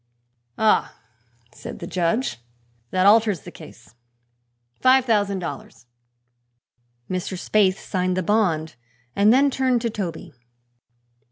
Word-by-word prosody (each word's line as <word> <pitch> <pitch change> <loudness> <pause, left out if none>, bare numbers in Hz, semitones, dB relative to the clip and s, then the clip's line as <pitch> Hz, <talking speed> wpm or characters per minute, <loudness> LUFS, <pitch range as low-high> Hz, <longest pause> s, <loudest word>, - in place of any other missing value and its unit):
"Ah," 220 -1 +1 0.6
said - - -9
the - - -7
judge, 175 - -1 0.5
"that 185 0 +1
alters 210 -5 +4
the - - -11
case. 100 - -15 0.9
Five 260 0 +4
thousand 205 -4 +1
dollars." 165 -8 -8 1.2
Mr. 185 0 -4
Spaythe 195 0 +2
signed 185 -1 -2
the 185 - 0
bond 165 - 0 0.4
and 205 +2 +4
then 275 +3 +4
turned 260 -2 +1
to 230 - -1
Toby. 175 -5 -6
200 Hz, 110 wpm, -22 LUFS, 180-225 Hz, 1.2 s, alters